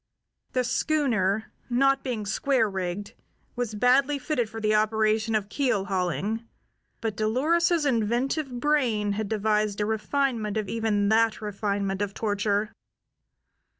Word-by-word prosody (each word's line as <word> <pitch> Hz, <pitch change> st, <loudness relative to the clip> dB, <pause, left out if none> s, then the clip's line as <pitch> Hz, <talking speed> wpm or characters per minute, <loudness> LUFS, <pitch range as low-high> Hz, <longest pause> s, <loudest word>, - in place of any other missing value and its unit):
The 255 Hz, -, +2 dB
schooner, 225 Hz, -8 st, 0 dB, 0.2 s
not 275 Hz, +2 st, +3 dB
being 235 Hz, -5 st, -3 dB
square 240 Hz, +2 st, +1 dB
rigged, 190 Hz, 0 st, -4 dB, 0.4 s
was 240 Hz, -3 st, -3 dB
badly 265 Hz, +6 st, +3 dB
fitted 260 Hz, -5 st, -1 dB
for 225 Hz, -, -7 dB
the 215 Hz, -1 st, +1 dB
operation 215 Hz, +1 st, +2 dB
of 205 Hz, -2 st, 0 dB
keel 220 Hz, -4 st, 0 dB
hauling; 195 Hz, +4 st, -1 dB, 0.6 s
but 225 Hz, -2 st, -2 dB
Dolores's 310 Hz, -, +2 dB
inventive 255 Hz, +4 st, 0 dB
brain 240 Hz, -8 st, +1 dB
had 205 Hz, 0 st, -2 dB
devised 210 Hz, -1 st, 0 dB
a 210 Hz, -, +1 dB
refinement 220 Hz, 0 st, -1 dB
of 215 Hz, -2 st, -2 dB
even 210 Hz, -2 st, 0 dB
that 225 Hz, 0 st, +3 dB
refinement 200 Hz, -2 st, -2 dB
of 200 Hz, -1 st, -2 dB
torture. 205 Hz, 0 st, 0 dB
220 Hz, 125 wpm, -26 LUFS, 205-250 Hz, 0.6 s, not